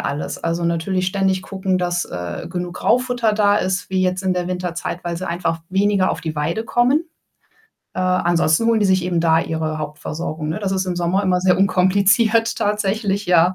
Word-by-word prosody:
alles. 145 +1 -4
Also, 170 +1 -1
natürlich 180 +2 0
ständig 190 -1 0
gucken, 190 -1 -2
dass, 175 -1 -1
äh, 90 0 -6
genug 175 0 -4
Graufutter 245 -2 +1
da 205 -1 +3
ist 190 -1 -1
wie 185 -1 +1
jetzt 185 +1 0
in 185 -1 0
der 180 0 -2
Winterzeit, 180 -1 -4
weil 170 0 -3
sie 185 - -5
einfach 170 -1 -2
weniger 195 0 +2
auf - - -3
die 160 -2 -5
Weide 170 +9 -1
kommen. 250 +8 +2 0.9
Äh, 185 - -3
ansonsten 175 +1 +2
holen 230 -2 +3
die 205 - +3
sich 185 -2 +2
eben 175 -2 0
da 165 -1 +3
ihre 160 -1 -3
Hauptversorgung, 155 +1 -5
ne? 160 - -2
Das 195 -2 -1
ist 190 -1 -1
im 180 - -2
Sommer 175 +3 0
immer 180 -2 +1
sehr 180 0 +3
unkompliziert 200 +4 +3
tatsächlich, 205 -1 -1
ja. 180 +1 +4
185 Hz, 190 wpm, -20 LUFS, 170-200 Hz, 0.9 s, ja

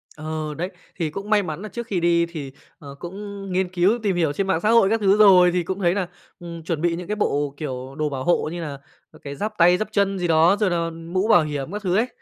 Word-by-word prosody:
Ờ, 155 0 -4
đấy. 175 +5 -4 0.3
Thì 165 -4 -2
cũng 195 +6 -7
may 210 -1 +3
mắn 160 -1 -5
là 215 - -7
trước 235 +1 -6
khi 190 -5 -1
đi 170 0 +3
thì, 155 -5 -7 0.3
ờ, 140 -2 -10
cũng 200 +2 -7
nghiên 185 0 0
cứu 185 +6 +2
tìm 200 -3 +1
hiểu 160 -4 +1
trên 195 +6 -2
mạng 190 -4 +1
xã 210 - +1
hội 230 -4 +5
các 225 +1 +1
thứ 200 -1 +3
rồi. 185 -4 +7
Thì 180 0 0
cũng 190 +3 -4
thấy 175 -3 +2
nà, 190 -2 -1 0.3
ừm, 170 -1 -8
chuẩn 160 -1 -3
bị 170 0 +1
những 175 0 -7
cái 210 - -2
bộ, 145 -8 -1
kiểu, 130 -2 -6
đồ 155 -1 0
bảo 135 -2 -4
hộ 175 0 +1
như 175 0 -5
là, 145 -4 -5 0.3
à, - - -17
cái 140 -1 -6
giáp 215 +8 -3
tay, 175 +1 +5
giáp 215 - -2
chân 200 -2 +1
gì 175 - -1
đó, 165 +4 +4
rồi 210 -3 +2
là 170 -1 0
mũ 165 +4 -3
bảo 175 -7 +5
hiểm 145 0 -4
các 210 +1 -5
thứ 185 -3 0
ấy, 225 +5 +2
175 Hz, 275 wpm, -22 LUFS, 160-195 Hz, 0.3 s, rồi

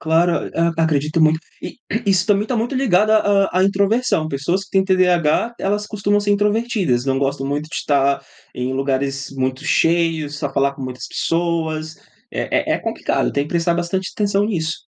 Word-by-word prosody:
Claro. 165 +2 +1
A 165 -1 +1
acredito 155 +1 0
muito. 155 0 +4 0.2
E - - -7 0.3
isso 190 -2 +3
também 205 -1 +3
está 245 +1 -2
muito 240 +5 -1
ligado 215 -5 +3
à 220 - +6 0.3
à 185 - +1
à - - +4
introversão, 200 -3 +1
pessoas 165 +7 -1
que - - -23
têm 190 -1 +2
TDAH, 185 +3 +2
elas 205 +1 -1
costumam 205 -1 0
ser 205 0 -1
introvertidas, 205 - +1
não 135 -1 0
gostam 135 0 -1
muito 145 +2 -3
de - - -9
estar 140 -1 +1 0.3
em 125 +1 -3
lugares 135 0 -2
muito 130 0 -2
cheios, 165 -3 +1
só 145 -2 -3
falar 140 0 +1
com 135 - -9
muitas 130 0 -6
pessoas, 160 -2 -2 0.3
é - - -1
é - - +3
é - - -7
complicado, - - -1
tem 140 - +1
que - - -10
prestar 170 0 +1
bastante 175 +2 -2
atenção 205 -1 +1
nisso. 170 -6 -2
170 Hz, 185 wpm, -19 LUFS, 140-200 Hz, 0.3 s, à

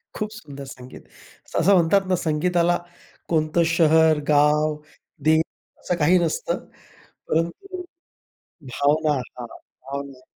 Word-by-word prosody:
खूप 215 -1 -3
सुंदर 145 -9 -10
संगीत, 125 -1 -11 0.6
असं 195 +5 +4
म्हणतात 180 +2 +4
ना, 185 - +2
संगीताला 175 +2 +1 0.5
कोणतं 160 +1 +2
शहर, 160 -2 +4
गाव, 150 +1 +3 0.5
देश 160 0 +5 0.4
असं 180 - -2
काही 170 +5 +4
नसतं, 165 -2 -2 0.6
परंतु 360 - -2 0.9
भावना 150 +1 +2
हां, 125 -1 -8
भावना. 140 +2 -9
155 Hz, 105 wpm, -23 LUFS, 145-175 Hz, 0.9 s, देश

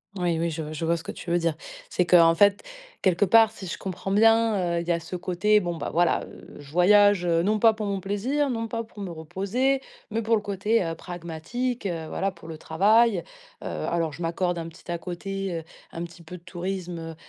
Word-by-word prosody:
Oui, 175 -3 0
oui, 170 0 0
je 155 -1 -5
je 160 +2 -3
vois 170 +1 +2
ce 160 - -9
que - - -5
tu - - -9
veux 175 - +3
dire. 165 -1 +1 0.4
C'est 180 - +1
qu'en 170 -2 +6
fait, 200 +4 +4 0.4
quelque 190 +2 +3
part, 225 +3 +6
si 195 -4 -9
je - - -4
comprends 190 0 -5
bien, 210 -4 +3
heu, - - -1
il 170 - -8
y - - +2
a 170 - +1
ce 170 +2 -7
côté: 190 +4 +2
«Bon, 175 -3 -3
bah, 155 - -4
voilà, 175 +1 +2
heu, - - -13
je 145 -1 -12
voyage, 205 +2 +5
heu, 170 -1 +2
non 215 +2 +1
pas 225 0 +6
pour 215 0 -4
mon 200 -1 -1
plaisir, 250 +10 -1
non 230 -2 -2
pas 230 0 -3
pour 220 -2 -15
me 180 - -5
reposer, 200 - -1 0.3
mais 225 +1 -1
pour 225 +1 +2
le - - -3
côté, 205 +2 0
heu, 165 -1 -3
pragmatique, 175 +9 -4
heu, 165 -4 -3
voilà 195 +4 -1
pour 170 -2 -14
le 160 -1 -7
travail. 205 +5 +3 0.4
Heu, - - -5
alors 165 -3 -2
je 170 - -10
m'accorde 175 +1 -1
un 165 0 -5
petit 170 +2 -17
à 170 - -1
côté, 195 +2 -4
heu, - - -10 0.3
un 165 - -5
petit 170 0 -10
peu 180 +3 -9
de 170 - -20
tourisme, 175 -2 -5
180 Hz, 235 wpm, -25 LUFS, 170-210 Hz, 0.4 s, qu'en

